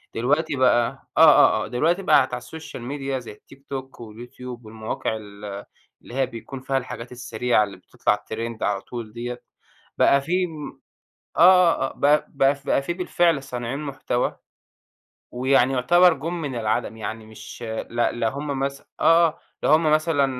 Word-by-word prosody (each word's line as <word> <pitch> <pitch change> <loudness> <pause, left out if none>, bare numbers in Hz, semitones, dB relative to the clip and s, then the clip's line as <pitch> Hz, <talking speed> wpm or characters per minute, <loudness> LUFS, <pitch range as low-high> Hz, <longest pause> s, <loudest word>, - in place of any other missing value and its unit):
دلوقتي 145 +6 +1
بقى 125 -2 +1
آه، - - +6
آه، - - +6
آه، - - -8
دلوقتي 170 +10 0
بقِت 130 -7 +4
على 125 - -3
الSocial 160 +5 -9
Media 135 -2 -3
زي - - -9
التيك 135 +6 -18
توك 135 -2 -6
واليوتيوب 120 +2 -10
والمواقع 110 0 -4
ال 100 -1 -9 0.4
اللي - - -12
هي 135 0 +2
بيكون 125 +3 -8
فيها 135 +1 -1
الحاجات 125 -2 -6
السريعة 125 -2 0
اللي 100 -1 -7
بتطلَع 105 0 -2
Trend 115 0 -5
على 100 -1 0
طول 115 -3 -8
ديّة، 120 +1 -6 0.5
بقى 140 - +4
في 180 +5 0
م 155 -3 -9 0.6
آه، - - +3 0.4
آه، 135 - 0
آه، - - -13
بقى 145 +2 +3
بقى 135 0 +3
في 140 - -21
بقى 140 - +2
في 170 - -2
بالفعل 175 -4 +1
صانعين 125 0 -4
مُحتَوى، 135 -4 -2 1.0
ويعني 130 +1 +2
يعتبَر 175 +7 +5
جُم 165 +3 -5
من 140 -4 -4
العدم، 110 0 -1
يعني 110 +1 -6
مش 110 +2 -11 0.3
ل 120 - -12 0.2
لا 115 - +2
هُم 140 +1 -4
مث 140 0 -2 0.2
آه، 165 +1 +6
آه، 160 +1 -7 0.2
لا - - +2
هُم 155 0 +4
مثلًا 155 -2 +3
130 Hz, 170 wpm, -23 LUFS, 115-145 Hz, 1.0 s, آه